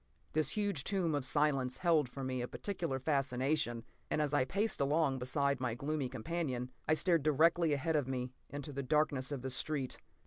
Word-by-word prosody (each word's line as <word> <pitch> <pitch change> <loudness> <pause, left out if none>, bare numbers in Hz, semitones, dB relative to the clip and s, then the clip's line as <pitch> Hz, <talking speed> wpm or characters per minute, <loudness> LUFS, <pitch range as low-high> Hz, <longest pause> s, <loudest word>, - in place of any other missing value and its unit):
This 155 +3 0
huge 200 -9 0
tomb 185 -4 0
of 145 -3 0
silence 135 -4 +1
held 160 -7 +3
for 135 +2 -6
me 130 -1 -2
a 120 - -2
peculiar 170 -7 -3
fascination, 135 -2 0 0.3
and - - 0
as 150 -1 0
I 145 -3 +3
paced 200 +5 0
along 140 -1 +2
beside 140 +2 0
my 120 -3 0
gloomy 140 0 -2
companion, 130 -3 -3 0.2
I 155 - +4
stared 170 -1 +3
directly 160 +3 +4
ahead 160 +3 0
of 145 -4 +1
me 125 -1 -2 0.2
into 145 0 -6
the 140 - -2
darkness 140 -1 +1
of 135 -3 -4
the 130 - -3
street. 135 -1 -2
145 Hz, 185 wpm, -34 LUFS, 130-155 Hz, 0.3 s, I